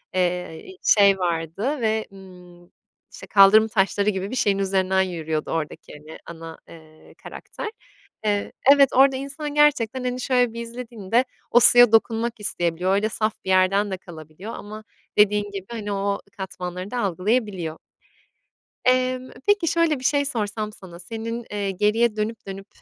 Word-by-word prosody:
eee, 180 - -2
şey 200 -2 +5
vardı 180 - -2
ve, 220 -1 0
ımm, 180 -2 -15 0.4
işte, - - -11
kaldırım 210 +2 +6
taşları 205 -1 +1
gibi 190 +1 -3
bir - - -3
şeyin 200 -5 +1
üzerinden 190 -1 +1
yürüyordu 160 -4 -3
oradaki, 160 -2 -5
hani, 150 +2 -12
ana, 165 -1 -9
eee, 155 -1 -16
karakter. 440 - -7 0.6
Eee, 205 -1 0 0.2
evet 275 -2 +5
orada 270 0 +5
insan 285 +2 -5
gerçekten 265 -5 +2
hani 250 0 -3
şöyle 250 -3 +1
bir 235 - -5
izlediğinde, 235 -1 -2 0.3
o 240 - +6
suya 245 -1 +7
dokunmak 225 +1 +1
isteyebiliyor. 180 -2 -1
Öyle 210 +2 +1
saf 215 0 -1
bir - - -4
yerden 195 +2 +3
de 190 - -3
kalabiliyor 170 +4 -10
ama 215 +1 -9 0.3
dediğin 210 0 +3
gibi, 195 -2 -6
hani, 210 -3 -5
o 200 0 -1 0.2
katmanları 185 0 -6
da 245 - -2
algılayabiliyor. 190 -3 -1 1.1
Eee, 255 0 +2 0.3
peki, 410 -4 +3
şöyle 330 -3 +1
bir - - -12
şey 285 +1 +2
sorsam 215 -5 -3
sana, 180 -4 -13
senin, 230 +3 -6
eee, 200 -1 -2
geriye 210 +3 +1
dönüp, 215 +1 -4
dönüp, 195 0 -8
205 Hz, 150 wpm, -23 LUFS, 185-235 Hz, 1.1 s, suya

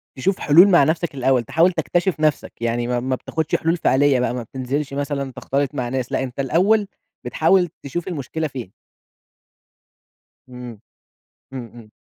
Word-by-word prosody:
تشوف 185 +9 -1
حلول 170 +7 +7
مع 175 -7 +5
نفْسك 160 +1 -1
الأول، 130 -2 +2
تحاول 165 +10 +3
تكتشِف 175 0 -1
نفْسك، 155 -2 0
يعني 120 0 -1
ما 125 0 0
ما 130 +1 -1
بتاخدش 160 +4 -2
حلول 165 +2 0
فعليّة 140 -3 +3
بقى 125 - 0
ما 125 -1 -4
بتنزِلش 135 +4 -4
مثلًا 140 -1 -3
تختلِط 140 +2 -2
مع 125 -3 -2
ناس 130 -1 -3
لأ، - - 0
أنت 130 0 -7
الأول 195 - +2 0.4
بتحاول 175 +8 +2
تشوف 170 +6 -4
المشكلة 160 -1 -3
فين. 125 -9 -8 1.8
إمم. 125 -3 -9 0.7
إمم، 125 -3 -6
إمم. 115 -3 -14
140 Hz, 155 wpm, -21 LUFS, 125-160 Hz, 1.8 s, حلول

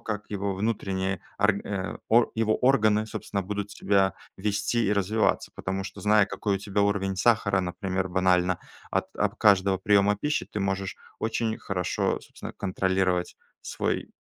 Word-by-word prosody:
как 105 -1 -5
его 100 -1 -2
внутренние 95 -3 -1 0.2
орга 100 -2 0
а 110 - +2
орг 120 - +5
его 110 -1 +2
органы, 110 -5 +3
собственно, 100 -2 -4
будут 100 +1 -4
себя 95 -1 +2 0.2
вести 105 +3 0
и 105 - +2
развиваться. 105 +3 +1
Потому 95 +1 -3
что, 95 - -8
зная, 105 -1 +5
какой 100 +1 -2
у - - -6
тебя 100 0 -2
уровень 100 -1 +1
сахара, 100 -2 +3
например, 95 +1 -2
банально 90 -1 +2 0.3
от - - 0
от - - 0
каждого 100 -2 +4
приёма 100 +1 +3
пищи, 150 +7 -1
ты 105 - -5
можешь 95 0 -2 0.2
очень 110 0 -1
хорошо, 90 -3 -1
собственно, - - -10
контролировать 95 -2 0 0.2
свой - - -2
100 Hz, 150 wpm, -27 LUFS, 95-105 Hz, 0.3 s, орг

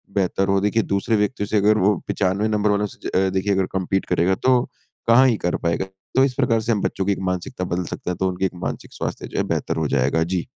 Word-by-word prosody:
बेहतर 95 0 +1
हो। 95 0 +3
देखिए 105 +2 +1
दूसरे 110 +3 +1
व्यक्ति 105 0 0
से 105 - 0
अगर 105 +2 +4
वो 105 - +4
95 100 +3 +1
नंबर 105 -1 +1
वालों 105 0 +2
से - - -7
अ, 95 +1 +2
देखिए 95 +2 0
अगर 95 -1 +1
कम्पीट 95 +1 -1
करेगा 90 +2 +2
तो 125 +2 +3 0.5
कहाँ 125 +3 +6
ही 115 -4 +2
कर 90 - -1
पाएगा। 85 +3 0 0.3
तो 130 - +5
इस 135 -2 +1
प्रकार 115 -1 +2
से 115 - -1
हम 105 - +1
बच्चों 95 - -1
की 100 - +2
एक - - -1
मानसिकता 90 +4 -4
बदल 90 0 -2
सकते - - -5
हैं, 90 - -2
तो 95 - 0
उनकी 90 +1 -2
एक - - 0
मानसिक - - -5
स्वास्थ्य - - -4
जो - - -7
है - - +2
बेहतर - - -1
हो 80 -2 0
जाएगा। 70 +5 +2
जी। 90 0 -2
95 Hz, 255 wpm, -22 LUFS, 90-105 Hz, 0.5 s, कहाँ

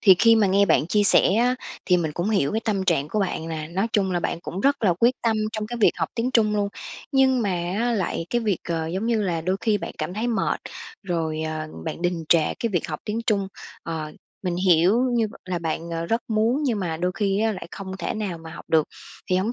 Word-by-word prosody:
thì 190 -3 +8
khi 230 +2 +6
mà 215 -2 +4
nghe 195 +1 +4
bạn 160 -3 +3
chia 210 +4 +2
sẻ 195 -1 +4
á 245 +3 +3 0.3
thì 180 - +4
mình 160 -3 -1
cũng 175 +7 -1
hiểu 195 -10 +1
cái 220 - 0
tâm 200 -4 0
trạng 160 -6 +1
của 215 - -1
bạn 170 -4 -2
nè, 155 -1 -4
nói 190 +6 0
chung 195 -2 +2
là 175 - 0
bạn 170 - -2
cũng 180 +2 -5
rất 280 +3 +2
là 190 -5 +4
quyết 240 +2 +5
tâm 225 -2 +2 0.2
trong 215 -1 -3
cái 240 +2 -5
việc - - +6
học - - -1
tiếng 240 +2 0
Trung 215 -4 +3
luôn, 205 -1 +1 0.4
nhưng 265 -2 +4
mà 205 - 0 0.3
á 240 +1 +1
lại 185 -5 -1
cái 240 - +1
việc, 210 -6 0
ờ 165 -1 -1
giống 190 +7 -2
như 230 -2 +1
là 175 -4 -1
đôi 185 +4 0
khi 210 -2 +2
bạn - - -6
cảm 180 - -3
thấy 220 +4 -1
mệt, 235 -2 0 0.4
rồi, 165 -4 -2
ờ, 155 0 -3 0.2
bạn - - -5
đình 175 -2 -1
trệ 165 -2 +3
cái 230 - -2
việc 175 -2 0
học 155 -1 -4
tiếng 215 +2 -2
Trung. 200 -3 +1 0.3
Ờ, 155 -2 -4 0.3
mình 180 -2 -1
hiểu 185 +4 +4
như 230 -2 +2 0.2
là 185 -1 -2
bạn, 165 0 -3
ờ, 165 0 -3
rất 230 +5 0
muốn 225 +6 +1
nhưng 245 -7 0
mà 170 -4 -2
đôi 180 +2 -1
khi 200 0 0
á 220 0 +2
lại 185 -4 -7
không 190 -1 -7
thể - - -3
nào 205 -6 -3
mà 165 0 -10
học 160 - -10
được. 160 -2 +3 0.4
Thì 185 - +4
hổng 200 +5 0
195 Hz, 255 wpm, -24 LUFS, 170-220 Hz, 0.4 s, thì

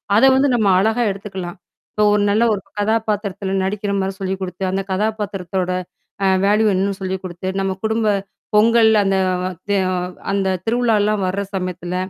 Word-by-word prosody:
அத 220 - +4
வந்து 275 +2 +3
நம்ம 215 -4 +2
அழகா 220 +4 +2
எடுத்துக்கலாம். 195 -2 -7 0.3
இப்போ 210 - 0
ஒரு 210 - +2
நல்ல 215 +3 +3
ஒரு 200 - -3 0.2
கதாபாத்திரத்தில 205 -2 -1
நடிக்கிறமாரி 195 -1 -1
சொல்லிக் 190 0 -2
குடுத்து, 180 0 -5
அந்த 195 +1 -1
கதாபாத்திரத்தோட 195 -3 -2 0.6
அ - - +4 0.2
வேல்யூ 210 +2 +3
என்னன்னு 195 +1 0
சொல்லிக் 190 0 -3
குடுத்து, 185 0 -6
நம்ம 195 0 0
குடும்ப 220 0 0 0.5
பொங்கல் 225 +1 +5
அந்த 195 0 +1 0.5
த - - +1 0.6
அந்த 195 -1 0 0.2
திருவிழாலாம் 220 -3 +2
வர 195 +2 -1
சமயத்தில 180 -1 -4
200 Hz, 145 wpm, -19 LUFS, 190-215 Hz, 0.6 s, பொங்கல்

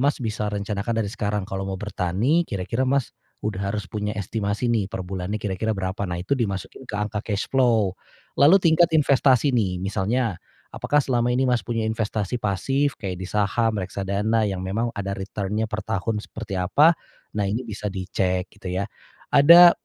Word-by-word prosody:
Mas, 140 +2 +2
bisa 105 -1 -2
rencanakan 105 +2 -2
dari 100 - -5
sekarang 105 -2 -2
kalau 95 0 -4
mau 95 - -3
bertani 105 - 0
kira-kira, 115 +6 -1
Mas, 135 -2 +1 0.3
udah 105 -3 -2
harus 105 -2 -3
punya 105 +2 -4
estimasi 105 +3 -1
nih, 105 -4 0
perbulannya 95 +1 -4
kira-kira 105 +1 -2
berapa 95 +1 -2
nah 85 - -2
itu 90 +8 -4
di 120 -6 +2
masukin 100 +6 -7
ke 105 - -4
angka 105 0 -2
cash 105 -2 -2
flow, 115 -7 +3 0.5
lalu 150 +7 +8
tingkat 170 0 +5
investasi 140 -2 +4
nih 100 -7 +1
misalnya, 100 +1 -1 0.3
apakah 145 - -1
selama 120 -2 +1
ini 130 +2 +2
Mas 125 -2 +2
punya 115 -2 -2
investasi 110 0 -2
pasif 135 +9 0
kayak 95 -3 -5
di 95 - -5
saham, 110 +2 +1
reksadana 100 +3 0
yang 95 -1 -3
memang 110 +6 -1
ada 100 -1 -3
return-nya 100 +2 -3
per 110 -1 -3
tahun 105 +3 -1
seperti 110 -3 -6
apa, 145 - +4 0.4
nah 105 - +1
ini 115 +5 -1
bisa 105 -2 -6
di 95 -1 -4
cek 90 0 0
gitu 95 - -7
ya 100 - 0 0.5
ada, 170 +5 +9
105 Hz, 175 wpm, -24 LUFS, 95-120 Hz, 0.5 s, ada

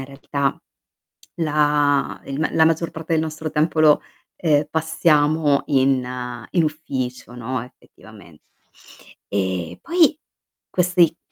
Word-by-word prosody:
in 135 - -7
realtà, 140 0 -2 0.8
la 150 -3 +1
il 140 +1 -5
la 160 - +4
maggior 165 +1 +1
parte 165 0 -4
del 160 - +2
nostro 155 0 -5
tempo 155 +1 0
lo, 150 -1 +5 0.4
ehm, 150 -3 +2
passiamo 155 -2 +2
in 135 -2 +2 0.5
in 175 - +2
ufficio, 130 -6 -4
no, 125 0 -4
effettivamente. 105 - -17 0.9
E 95 -3 -2
poi 335 -3 +3 0.5
questi 175 -2 +2
150 Hz, 110 wpm, -21 LUFS, 135-160 Hz, 0.9 s, lo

